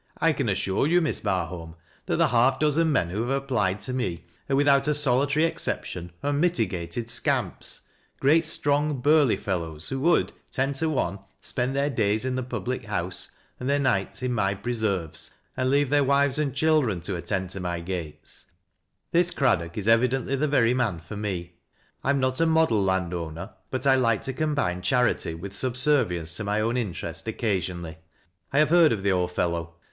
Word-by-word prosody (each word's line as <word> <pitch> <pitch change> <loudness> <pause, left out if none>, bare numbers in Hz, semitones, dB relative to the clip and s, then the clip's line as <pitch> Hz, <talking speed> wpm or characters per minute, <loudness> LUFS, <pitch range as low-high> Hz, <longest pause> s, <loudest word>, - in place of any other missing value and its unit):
" - - -27
I 165 0 +3
can 135 -6 -1
assure 100 +5 0
you, 175 +3 +4
Miss 160 -3 -1
Bai 95 -6 0
aolm, 80 -1 -8 0.3
that - - +1
the - - +3
half 125 +2 +3
dozen 155 +2 +2
men 85 - +1
who 105 +4 -2
have 135 +3 -1
applied 105 -8 0
to 130 - -3
me 95 -11 -3 0.2
are 135 - +2
without 140 0 +4
a 150 - +2
solitary 140 +2 +3
exception, 90 - -3
unmitigated 120 - 0
scamps - - 0 0.2
— - - -39
greai 155 +5 +4
strong 145 -2 0
burly 145 -1 +4
fellows, 80 -5 -3
who 135 - -2
would, 170 +5 +2 0.2
ten 135 +1 0
to 160 +4 -1
one, 100 - -1 0.2
spend 125 +2 -2
theii 140 +1 0
days 110 0 +1
in 130 - -1
the 130 - -1
public 125 0 -4
house, 90 -4 -3 0.3
and 125 - -3
their 140 - +3
nights 130 -3 0
in 125 -1 0
my 100 -3 +1
presorvcEj 100 -7 -1 0.2
and 130 0 0
leave 140 0 +2
their 145 -1 +4
wives 140 +1 +2
and 140 -3 -1
children 150 - +2
to 95 +2 -4
attend 95 +1 -3
to 95 - -5
my 90 -2 -3
gates 85 -4 -5 0.6
This 175 +1 +3
Craddock 85 - 0
is 105 0 -3
e\'idently 125 +3 +3
the 150 - +2
very 125 -5 +3
man 120 -8 0
for 80 +6 -9
me; 90 -4 -4 0.5
I - - -1
am 140 0 +3
not 130 +2 0
a 165 - +4
model 160 -10 +3
land 95 -2 0
owner, 85 +3 -5 0.2
but 130 +1 -3
I 135 - +6
like 115 -5 +2
to 135 - -2
combine 145 -11 -1
charity 120 -4 +1
with 95 +4 -7
subservience 125 - +1
to 110 - -3
my 105 +1 0
own 115 +3 0
interest 95 -5 -4
occasionally. 90 -7 -2 0.5
I 140 - 0
have 150 +1 +4
heard 170 -3 +6
of 105 -4 -2
the 100 - +2
old 90 -1 0
fellow. 85 -1 -2
120 Hz, 190 wpm, -26 LUFS, 95-140 Hz, 0.6 s, I